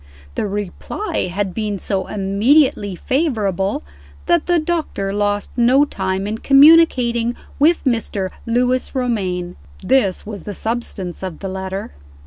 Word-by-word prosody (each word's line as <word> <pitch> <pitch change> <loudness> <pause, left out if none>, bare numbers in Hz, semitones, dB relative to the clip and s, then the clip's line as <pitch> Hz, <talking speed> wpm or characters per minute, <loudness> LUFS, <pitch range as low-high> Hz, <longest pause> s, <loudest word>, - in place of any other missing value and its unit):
The - - -2
reply 205 - -3
had 195 0 -2
been 210 -1 -2
so 190 -1 -2
immediately 205 +2 +2
favorable, 205 - -1 0.4
that 170 - +2
the 350 -1 +3
doctor 310 - -2
lost 205 0 -1
no 255 +4 +4
time 190 -5 -2
in 215 +2 -3
communicating 275 -5 +5 0.2
with 325 +4 +4
Mr. 215 -6 -1 0.2
Lewis 250 +3 0
Romayne. 190 -9 -2 0.3
This 215 -9 +1
was 205 -3 -7
the 205 +2 -7
substance 220 -6 -4
of 185 -4 -5
the 195 - -6
letter. 190 - -5
210 Hz, 125 wpm, -19 LUFS, 195-255 Hz, 0.4 s, communicating